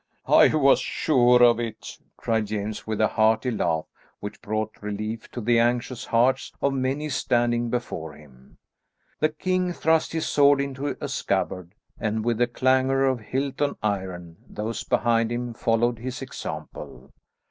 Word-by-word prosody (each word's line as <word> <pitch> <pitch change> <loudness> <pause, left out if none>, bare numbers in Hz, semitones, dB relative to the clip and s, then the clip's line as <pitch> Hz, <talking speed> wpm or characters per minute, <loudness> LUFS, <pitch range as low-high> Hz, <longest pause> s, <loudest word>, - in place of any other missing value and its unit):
"I - - +6
was 140 -3 +5
sure 125 -4 +3
of 120 -1 +5
it," 115 -2 -6 0.2
cried 110 -2 -1
James 105 +1 -4
with 110 -1 -2
a 110 - +4
hearty 110 +2 +2
laugh 85 -7 -1 0.3
which 105 - -8
brought 110 +1 -3
relief 105 +2 -5
to 120 - -6
the 115 +1 +3
anxious 120 +1 0
hearts 125 +3 +2
of 140 - +1
many 135 +3 -1
standing 120 -4 0
before 100 -10 -4
him. 70 -3 -18 0.6
The 155 - +3
king 180 +3 -1
thrust 160 -1 +1
his 160 -1 -1
sword 145 -1 +4
into 140 +1 -3
a - - -4
scabbard, 95 - -2 0.2
and, 110 0 -2
with 120 -1 0
a 120 - +4
clangour 130 +2 +2
of 130 -2 +1
hilt 135 +5 -3
on 145 - 0
iron, 95 -5 -3
those 110 +2 -4
behind 115 -2 +1
him 120 0 -3
followed 115 +1 +1
his 130 +2 -5
example. 130 - -8
120 Hz, 155 wpm, -25 LUFS, 110-130 Hz, 0.6 s, I